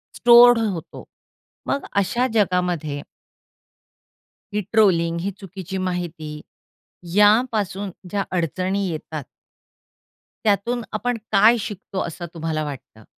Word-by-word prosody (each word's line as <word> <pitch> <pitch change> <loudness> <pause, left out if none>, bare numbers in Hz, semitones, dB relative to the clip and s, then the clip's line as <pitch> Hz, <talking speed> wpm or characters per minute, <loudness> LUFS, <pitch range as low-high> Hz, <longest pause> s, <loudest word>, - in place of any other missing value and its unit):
Stored 240 0 +7
होतो. 200 -7 -4 0.6
मग 275 - -1
अशा 205 +6 +1
जगामध्ये 180 -8 0 1.5
ही 210 - 0
ट्रोलिंग, 170 -6 +3
ही 195 +3 -2
चुकीची 190 -1 -7
माहिती 170 -5 -4 0.7
यापासून 210 -2 +3 0.2
ज्या 200 +1 -1
अडचणी 185 +3 -1
येतात, 155 -2 -5 1.2
त्यातून 225 +4 +1
आपण 240 +3 -1
काय 215 +3 +6
शिकतो 200 -2 -5
असं 170 +1 -7
तुम्हाला 160 -2 -2
वाटतं? 135 -6 -9
190 Hz, 95 wpm, -22 LUFS, 170-215 Hz, 1.5 s, Stored